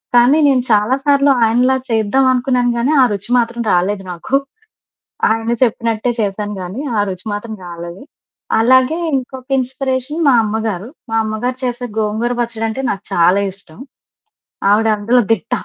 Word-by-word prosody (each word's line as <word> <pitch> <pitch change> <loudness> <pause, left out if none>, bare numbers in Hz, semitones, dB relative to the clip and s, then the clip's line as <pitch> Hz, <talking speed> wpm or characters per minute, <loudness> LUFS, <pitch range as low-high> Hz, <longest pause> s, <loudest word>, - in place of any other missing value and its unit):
కానీ 245 +5 +5
నేను 260 -3 +3
చాలా 210 +4 +3
సార్లు 280 -1 +4
ఆయనలా 245 +4 +2
చేద్దామనుకున్నాను, 250 +2 +2
గానీ 250 +5 +1
ఆ - - +7
రుచి 200 +4 -5
మాత్రం 235 0 -2
రాలేదు 190 +2 0
నాకు. 180 +10 -1 0.9
ఆయన 225 +1 -1
చెప్పినట్టే 230 0 +1
చేశాను, 205 0 -2
గానీ 190 +9 -6 0.2
ఆ - - +3
రుచి 185 +3 -8
మాత్రం 220 +2 -6
రాలేదు. 170 +1 -8 0.6
అలాగే, 260 +6 +4 0.2
ఇంకొక 260 0 -6
ఇన్‌స్పిరేషన్ 260 +3 -2
మా 260 - +5
అమ్మగారు. 215 -2 -3 0.2
మా 225 - 0
అమ్మగారు 220 +4 -3
చేసే 245 0 -3
గోంగూర 220 +3 -1
పచ్చడంటే 230 +1 -3
నాకు 195 -1 -4
చాలా 180 +2 +4
ఇష్టం. 185 -5 -18 0.9
ఆవిడ 220 +2 +3
అందులో 230 +5 +2
దిట్ట. 225 +1 -6
230 Hz, 140 wpm, -16 LUFS, 205-255 Hz, 0.9 s, ఆ